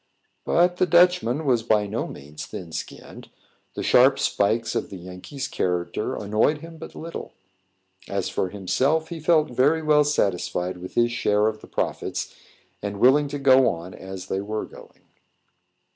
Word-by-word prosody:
But 175 +1 +3
the 185 - +2
Dutchman 170 -5 +3
was 125 -4 +3
by 110 -2 +2
no 105 +3 -3
means 75 +2 -9
thin 85 -3 -8
skinned; 80 - -8 0.5
the - - -3
sharp - - +5
spikes 115 +3 0
of - - -2
the 95 - -8
Yankee's 90 - -7
character 90 0 -2
annoyed 110 +9 +1
him 165 0 -10
but 160 - -10
little. 165 +1 -7 0.8
As 100 -2 -1
for 95 - -2
himself, 135 - 0
he 170 -2 -6
felt 155 -2 +2
very 145 +6 +2
well 150 -1 +5
satisfied 90 -9 -1
with 90 +1 -9
his 120 0 +3
share 105 -3 +1
of 110 0 -1
the - - -13
profits, - - -3 0.5
and 100 -1 -4
willing 145 +5 +5
to 145 +1 -4
go 135 -2 +5
on 85 +2 -6
as 95 -1 -8
they 95 0 -2
were 105 +2 -3
going. - - -16
115 Hz, 160 wpm, -24 LUFS, 95-150 Hz, 0.8 s, sharp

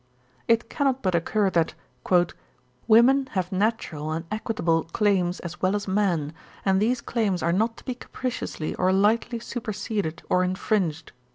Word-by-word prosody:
'It 230 0 +3
cannot 270 0 0
but 185 -2 +1
occur 195 +4 +1
that 165 -2 +1 1.1
"Women 255 +5 +5
have 185 -3 -1
natural 185 -7 -1
and 165 +1 -3
equitable 175 -7 0
claims 185 -1 +1
as 175 0 -7
well 185 +2 +2
as 205 0 -3
men, 180 -7 0 0.3
and 190 0 +3
these 240 +3 +1
claims 205 -7 -1
are 170 +1 +2
not 225 +4 +1
to - - -15
be 255 - -2
capriciously 245 -9 -4
or 185 +1 +1
lightly 220 +5 +2
superseded 215 -7 -4
or 180 - +3
infringed." 185 -3 -1
200 Hz, 150 wpm, -25 LUFS, 175-225 Hz, 1.1 s, Women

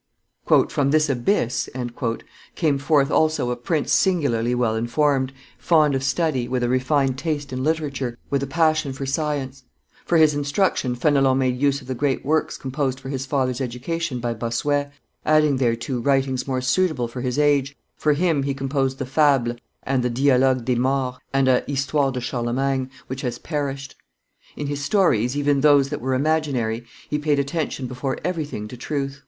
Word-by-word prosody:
"From 140 -1 0
this 155 0 +3
abyss 125 - 0 0.4
" 115 - -13
came 150 -5 +1
forth 145 0 +2
also 155 -6 +2
a - - -1
prince 145 +5 -1
singularly 125 - +2
well 120 -3 +1
informed, 130 +3 +1 0.3
fond 155 -4 +3
of 135 - 0
study, 135 -3 0
with 125 -1 -1
a 120 - +1
refined 130 +1 +1
taste 145 -2 -3
in 130 0 -3
literature, 140 -6 -2
with 140 -1 +1
a 140 - -2
passion 155 -1 +1
for 135 +1 -5
science; 135 -2 -2 0.4
for 170 - +2
his 155 -2 +5
instruction 145 -2 0
Fenelon 135 0 +3
made 130 -1 0
use 140 0 +2
of 130 - -15
the 130 - -2
great 135 +1 -1
works 155 +2 0
composed 135 -1 -2
for 135 - -8
his 135 -1 -4
father's 130 -2 0
education 130 +3 -3
by 120 0 -2
Bossuet, 140 +6 -1 0.3
adding 150 -2 +3
thereto 120 +1 0
writings 135 0 0
more 130 -1 -1
suitable 135 -1 +1
for 125 +2 -7
his 125 +1 -2
age; 145 -1 +2 0.2
for 150 - +2
him 160 -1 +1
he 135 0 -2
composed 135 -1 -1
the 135 - -3
Fables 135 -4 +2 0.3
and 130 -1 0
the 125 - 0
Dialogues 130 0 +3
des 125 0 0
Morts, 130 0 0
and 135 -1 +2
a 130 -1 +3
Histoire 140 0 0
de 130 - -3
Charlemagne 130 +2 -1 0.2
which 130 +1 -6
has 120 -3 -3
perished. 140 -3 -4 0.6
In 150 - -4
his 145 0 -3
stories, 145 - +2
even 145 -1 +2
those 145 -2 +5
that 150 - -4
were 130 +1 0
imaginary, 130 -6 0 0.2
he 150 - -1
paid 150 -1 +1
attention 140 -1 -2
before 130 +2 -3
everything 150 -12 -3
to 125 - -8
truth. 140 +1 -4
135 Hz, 175 wpm, -22 LUFS, 125-145 Hz, 0.6 s, his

